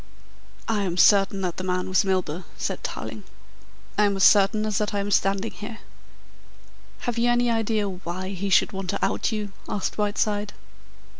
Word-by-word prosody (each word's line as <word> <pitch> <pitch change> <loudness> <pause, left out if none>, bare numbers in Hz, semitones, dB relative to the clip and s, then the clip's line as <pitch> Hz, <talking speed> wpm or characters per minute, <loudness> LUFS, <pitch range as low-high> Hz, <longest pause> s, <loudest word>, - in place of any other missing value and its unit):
"I 220 -2 +1
am 180 -3 -2
certain 195 +1 +5
that 180 -2 -2
the 185 - -4
man 180 0 -1
was 185 +2 +3
Milburgh," 185 -3 -1
said - - -3
Tarling. - - -5 0.8
"I 210 - +6
am 200 -1 +1
as 195 - +1
certain 210 +1 +5
as 210 -2 0
that 210 -1 -1
I - - +1
am 200 +1 -2
standing 195 +2 +1
here." 220 +2 -8 1.2
"Have 240 -1 -2
you 240 +1 +3
any 240 0 +2
idea 220 -2 0
why 185 0 -5
he 195 0 -3
should 195 - +4
want 195 -2 -5
to 200 - 0
out 195 - -1
you?" 210 -2 -3 0.2
asked 205 +1 -3
Whiteside. 205 0 0
200 Hz, 175 wpm, -25 LUFS, 190-215 Hz, 1.2 s, I